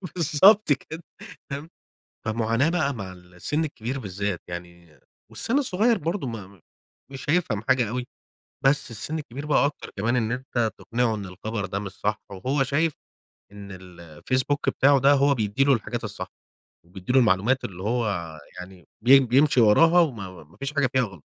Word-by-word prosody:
بالضبط 180 +4 +5
كده، 160 +5 -8 0.5
فاهم. 145 +4 -5 0.6
فمعاناة 115 +6 +1
بقى 155 -5 0
مع 100 -6 -7
السن 90 - -4
الكبير 135 -3 -4
بالذات 100 -3 -3
يعني 85 -2 -10 0.3
والسن 250 - -1
الصغيّر 230 -2 +2
برضو 165 -1 -3
ما 100 -6 -8 0.5
مش 135 +1 -8
هيفهم 145 - +1
حاجة 125 -4 +3
أوي، 125 +1 -4 0.6
بس 135 -2 +2
السن 150 +9 -3
الكبير 140 0 -8
بقى 150 -1 +3
أكتر 145 - -5
كمان 115 +5 0
إن 115 -2 0
أنت 125 -3 -1
تقنعه 115 -1 -1
إن 105 -2 -6
الخبر 100 +3 -5
ده 95 +1 -3
مش 100 -1 -6
صح، 105 +2 -3
وهو 130 +9 -1
شايف 150 +4 0 0.6
إن 100 -1 -10
ال 90 -2 -12
الفيسبوك 130 - -1
بتاعه 140 0 +4
ده 140 +2 +5
هو 140 0 +4
بيدّي 110 +2 0
له 140 - +4
الحاجات 120 -5 -2
الصح، - - -6 0.6
وبيدّي 95 +5 -5
له 135 - +6
المعلومات 115 +3 +2
اللي 95 -1 -7
هو 115 +3 0 0.5
يعني 90 -3 -11
بي 135 +4 +7
بيمشي 135 +2 +3
وراها 165 +11 +6
وما 100 - -3
ما 75 - -22
فيش 140 +2 -5
حاجة 145 -3 +2
فيها 130 - +4
غلط. 95 - -7
120 Hz, 165 wpm, -25 LUFS, 100-140 Hz, 0.6 s, بي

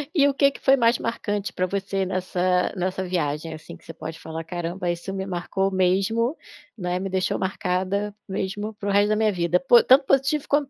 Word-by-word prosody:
E 285 -3 +5
o 280 - +1
que 280 0 +4
que - - -12
foi 270 - +5
mais 235 -1 +3
marcante 210 -3 -3
pra 185 - 0
você 195 0 -2
nessa 180 -1 0
nessa 185 +1 -2
viagem, 160 -3 -2
assim, 155 0 -10
que - - -25
você - - -9
pode 160 0 -8
falar: 160 0 -6
"Caramba, 175 +1 -3
isso 175 +3 -5
me 190 0 -3
marcou 190 +1 -1
mesmo, 195 - +1 0.4
né, 180 -2 -2
me 195 - -3
deixou 185 0 0
marcada 190 +1 -1
mesmo, 200 +3 -3
para 205 0 -4
o - - +1
resto 205 +1 +3
da 215 - +2
minha 215 0 +2
vida, 175 0 +1
po 240 +6 +6
tanto 270 +2 +6
positivo 275 +3 +1
quanto 290 -1 +1
190 Hz, 210 wpm, -24 LUFS, 180-215 Hz, 0.4 s, po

